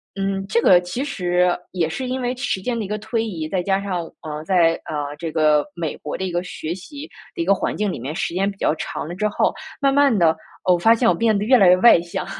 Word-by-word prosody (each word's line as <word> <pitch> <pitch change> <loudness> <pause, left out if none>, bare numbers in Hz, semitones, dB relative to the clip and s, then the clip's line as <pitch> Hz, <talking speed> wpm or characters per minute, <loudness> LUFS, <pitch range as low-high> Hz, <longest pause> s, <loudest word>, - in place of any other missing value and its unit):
嗯， 195 0 -2
这 235 +3 +1
个 180 -1 +6
其 180 +9 -4
实， 180 -9 +1 0.2
也 170 -4 -1
是 255 +10 -4
因 255 +1 -3
为 245 +1 -1
时 250 -7 -2
间 240 +3 -2
的 210 - -3
一 - - -6
个 210 +1 -3
推 220 +1 -2
移。 160 -7 -5
再 185 0 -1
加 195 +1 0
上 185 -3 -2 0.2
呃， 150 -1 -6
在， 170 -3 +3
呃 145 -2 -4
这 165 - -4
个 155 -2 +3
美 165 -4 -4
国 150 - -6
的 190 - -4
一 185 - -3
个 175 0 -1
学 165 -2 -5
习 285 - -9 0.3
的 - - -3
一 - - -1
个 195 - +4
环 - - -2
境 210 -2 -1
里 - - -6
面， 140 +6 -5
时 170 - -2
间 195 +2 0
比 195 - -9
较 - - +1
长 155 - -5
了 175 - -6
之 210 +3 0
后， - - +1 0.3
慢 275 -1 +3
慢 280 -6 +4
的， 160 -2 +3 0.3
哦， 180 -1 +4
发 225 +7 +5
现 230 0 +1
我 - - +4
变 225 -3 +2
得 205 - -1
越 255 +1 +5
来 195 - +5
越 180 - +6
外 210 -2 +7
向， 170 0 -5
190 Hz, 290 characters per minute, -21 LUFS, 170-220 Hz, 0.3 s, 外